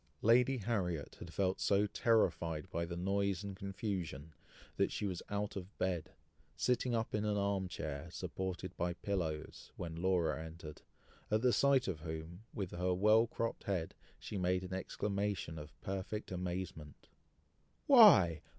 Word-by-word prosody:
Lady 125 +4 +5
Harriet 95 - -2
had 85 - -8
felt 95 +1 0
so 100 +1 +3
terrified 95 -7 +1
by 85 -1 -1
the 85 0 -5
noise 100 +1 0
and 100 -1 -5
confusion, 95 -7 -4 0.4
that - - +2
she - - -2
was 90 -3 -2
out 105 0 -2
of 95 +1 -7
bed, 90 -3 -1 0.5
sitting 125 -1 +1
up 115 0 -1
in 105 - 0
an 105 -1 +1
arm 100 -1 0
chair, 80 -1 -5
supported 95 +1 -4
by 85 0 -1
pillows, 85 -6 -3
when 85 -2 -5
Laura 85 -4 +1
entered, 80 -1 -9 0.5
at 110 +2 +1
the 125 -1 +4
sight 140 -2 +4
of 90 -5 -2
whom, 80 +3 -6
with 95 -3 -4
her 90 +1 0
well 110 +4 +5
cropped 115 0 -3
head, 90 -5 -1 0.2
she 100 - -5
made 90 0 +1
an 95 0 -6
exclamation 100 -3 -2
of 75 0 -11
perfect 100 +2 -4
amazement. 90 -5 -5 0.8
"Why! 110 - +8
95 Hz, 150 wpm, -35 LUFS, 85-105 Hz, 0.8 s, Why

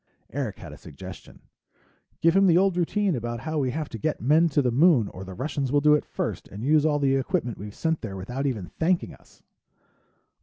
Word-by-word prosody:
Eric - - -3
had - - -10
a - - -13
suggestion. - - -11 0.8
"Give 165 +2 +4
him 195 0 +5
the 170 -1 +5
old 190 0 +3
routine 185 +1 +1
about 120 -1 -4
how 155 +1 -2
we 130 -3 0
have 150 +4 -3
to 115 - -7
get 155 -1 -1
men 155 +7 +4
to 145 -1 +1
the 125 - +1
Moon 135 - +4
or 95 - -9
the 95 -1 -9
Russians 135 +1 -2
will 145 - +4
do 150 +1 +5
it 150 - +2
first - - -4
and 105 +3 -8
use 155 +2 +4
all 150 -1 +2
the 135 -2 +2
equipment 125 -3 -2
we've 105 +1 -8
sent 160 -1 -1
there 100 -4 -6
without 125 +9 -3
even 105 -9 -4
thanking 175 +2 +1
us." - - -21
145 Hz, 220 wpm, -25 LUFS, 120-160 Hz, 0.8 s, him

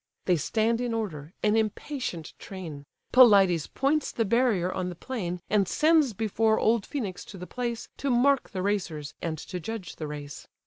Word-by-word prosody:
They 180 - +4
stand 225 - +1
in 240 -2 -1
order, 160 -9 -4
an 210 0 +3
impatient 220 - -2
train: 165 -7 -8 0.3
Pelides 195 - +6
points 285 +2 0
the 225 - 0
barrier 215 -5 +2
on 180 -1 -2
the 175 - -7
plain, 180 -5 -4
And 205 -3 +2
sends 305 - +3
before 220 +1 +1
old 225 -2 +2
Phœnix 215 -11 -4
to 195 - -10
the 180 - -7
place, 235 +5 -4
To 280 - -2
mark 265 +2 +3
the 185 -2 -4
racers, 175 -8 -2
and 160 -2 -2
to 180 +4 -6
judge 195 +1 -6
the 155 - -4
race. 145 -1 -8
210 Hz, 175 wpm, -27 LUFS, 175-235 Hz, 0.3 s, Pelides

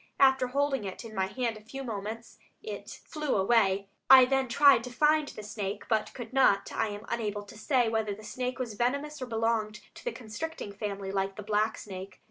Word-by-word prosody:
After 265 -1 +5
holding 275 -1 0
it 195 +4 -6
in 220 - -9
my 190 -2 0
hand 235 0 -2
a - - -13
few 270 +5 -7
moments 225 0 -6 0.2
it 440 - -7
flew 305 -3 -2
away. 195 -1 +3 0.2
I 260 -1 +10
then 270 0 +1
tried 275 -1 +6
to - - -6
find 300 +3 +3
the 215 - -8
snake, 205 -1 -5
but 220 -2 0
could 240 -1 -8
not. 255 -7 +4
I - - 0
am 205 +1 -7
unable 210 -3 -2
to 205 - -13
say 245 +3 +2
whether 220 -2 -1
the 215 - -13
snake 250 +4 -3
was 245 -4 -3
venomous 280 +6 -1
or 255 - -3
belonged 225 -2 0
to - - -13
the - - -1
constricting 245 - -6
family, 200 -1 -4
like 195 0 -1
the 210 - -7
black 215 +1 +1
snake. 190 -1 -8
225 Hz, 205 wpm, -29 LUFS, 210-260 Hz, 0.2 s, I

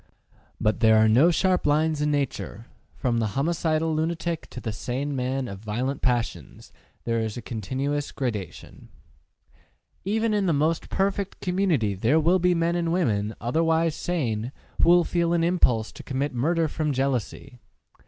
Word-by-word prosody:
But 110 0 +1
there 110 -2 +5
are 110 0 +5
no 125 +10 +5
sharp 180 0 +1
lines 155 +1 +2
in 150 - +1
nature; 140 -6 -2 0.3
from 120 -2 0
the 110 -1 -2
homicidal 160 +1 0
lunatic 165 +1 -2
to - - -8
the 115 - -4
sane 135 +6 -3
man 130 0 -2
of 100 -3 -7
violent 120 +6 -3
passions 120 - -2 0.3
there 115 -1 0
is 110 -1 -3
a - - -5
continuous 135 +7 -3
gradation. 110 - -5 1.1
Even 220 +3 0
in 205 -2 +1
the 170 - +3
most 155 +3 0
perfect 195 0 -1
community 180 - +1
there 115 +11 +2
will 175 +4 +3
be 180 0 +3
men 170 +1 +1
and 170 -1 0
women, 110 - 0
otherwise 160 +6 +1
sane, 125 -10 -2 0.3
who - - +5
will 175 0 +6
feel 170 0 0
an 170 -1 +2
impulse 130 -11 +2
to - - -11
commit 135 +1 -2
murder 160 +7 +1
from 150 -1 -2
jealousy. 130 -2 -2
145 Hz, 160 wpm, -25 LUFS, 120-170 Hz, 1.1 s, will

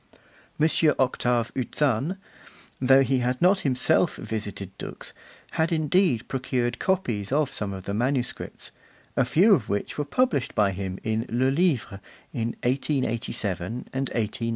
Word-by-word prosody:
M. 155 - +5 0.3
Octave 125 -2 +1
Uzanne, 135 - 0 0.6
though 135 +1 +6
he 135 -1 +1
had 125 +1 -1
not 190 +2 +4
himself 130 -6 +2
visited 100 -3 -5
Dux, - - -6 0.4
had 160 +1 0
indeed 155 - +2
procured 125 -2 -1
copies 125 - -1
of 145 -1 +2
some 105 -5 -2
of 95 -1 -7
the 100 - -3
manuscripts, 125 +3 -2 0.4
a - - +3
few 200 +7 +5
of - - +1
which 100 +7 -2
were - - +1
published 145 - 0
by 105 -4 +3
him 95 0 -4
in 110 +1 -1
Le 130 +3 +2
Livre, 135 - 0 0.3
in 115 -2 -2
1887 115 - -1 0.2
and 135 0 -1
1889. 115 +1 -2
125 Hz, 140 wpm, -26 LUFS, 110-145 Hz, 0.6 s, though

